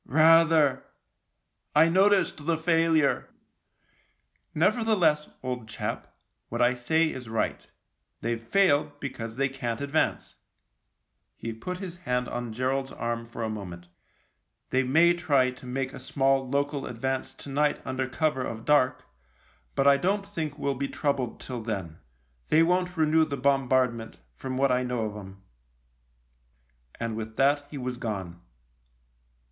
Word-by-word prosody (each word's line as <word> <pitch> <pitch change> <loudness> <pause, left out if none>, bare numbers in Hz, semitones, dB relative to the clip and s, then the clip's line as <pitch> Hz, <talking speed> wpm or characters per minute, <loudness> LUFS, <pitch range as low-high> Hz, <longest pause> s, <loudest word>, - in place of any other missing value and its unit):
" - - -47
Rather 160 -1 +5 0.5
— - - -48
I 155 +2 +7
noticed 190 -4 +3
the 165 -1 +2
failure." 165 -3 +2 0.6
" - - -41
Nevertheless, 175 -5 +2
old 125 -3 -4
chap, 105 - -5 0.3
what - - -4
I 120 +1 +4
say 160 +7 +1
is 125 -3 -8
right. 110 -1 -2 0.5
They've 115 0 -2
failed 145 +1 +2
because 115 -5 -6
they 135 +2 +1
can't 120 -4 -4
advance." 140 +2 -1 1.0
He 115 - -5
put 180 +12 -5
his 180 -2 -7
hand 125 -7 -1
on 120 -1 -4
Gerald's 130 +3 -1
arm 115 0 -3
for 115 0 -6
a 110 - -1
moment. 90 -5 -8 0.4
" - - -50
They 130 - +3
may 160 +7 +4
try 140 -7 +2
to 125 0 -14
make 130 +1 -3
a - - -8
small 135 0 +1
local 140 +1 -1
advance 130 +2 -3
to 140 - -10
night 145 +2 +1
under 130 0 -2
cover 150 -1 0
of 115 -2 -6
dark, 145 -4 +3 0.7
but 135 - +2
I 140 0 +7
don't 195 +6 0
think 160 -7 -4
we'll 140 - -1
be 140 +1 -3
troubled 140 -5 -2
till 125 -3 -6
then. 95 -8 -5 0.5
They 160 +1 +5
won't 180 +1 +1
renew 160 0 +4
the 145 -3 -3
bombardment, 130 -3 +1 0.2
from 130 - -5
what 135 0 +3
I 125 0 +2
know 125 -2 -2
of 105 -1 -3
'em." 95 -1 -10 1.6
And 115 -1 -3
with 110 0 -6
that 145 +1 +3
he 145 - -7
was 125 -1 -4
gone. 95 -7 -5
135 Hz, 150 wpm, -27 LUFS, 120-155 Hz, 1.6 s, I